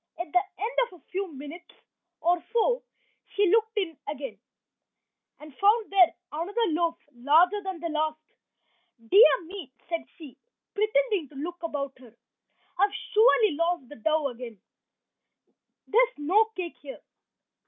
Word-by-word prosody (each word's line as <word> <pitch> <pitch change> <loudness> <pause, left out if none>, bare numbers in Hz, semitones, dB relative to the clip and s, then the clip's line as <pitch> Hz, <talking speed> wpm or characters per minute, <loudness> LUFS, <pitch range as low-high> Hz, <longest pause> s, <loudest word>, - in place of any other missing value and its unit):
At 345 -3 -5
the 360 - +6 0.2
end 435 +4 -2 0.2
of 360 - -15
a - - -37
few 380 -1 -3
minutes 295 +5 -11 0.5
or 345 0 +2
so 480 +1 +2 0.5
she 400 -3 +3
looked 445 0 +2
in 360 -6 -1
again, 270 -8 -6 1.0
and 300 -2 -13
found 420 - +3
there 370 -4 +5 0.2
another 335 +7 -5
loaf, 335 +1 0 0.2
larger 320 +11 +3
than 380 -3 -5
the 335 - -3
last. 310 0 -1 0.9
"Dear 410 -3 +7
me," 345 -5 -9 0.2
said 335 -1 -2
she, 300 -6 -12 0.4
pretending 430 - +1
to 295 - -18
look 340 +5 -6
about 280 -5 -4
her, 240 -3 -17 0.6
"I - - +2
have 405 - -6 0.2
surely 440 -1 +5
lost 335 -3 -1
the 295 - -10
dough 310 +3 +1
again. 235 -4 -9 1.3
There's - - +2
no 365 +10 +3
cake 355 -3 -5
here." 280 -2 -10
340 Hz, 145 wpm, -27 LUFS, 295-405 Hz, 1.3 s, Dear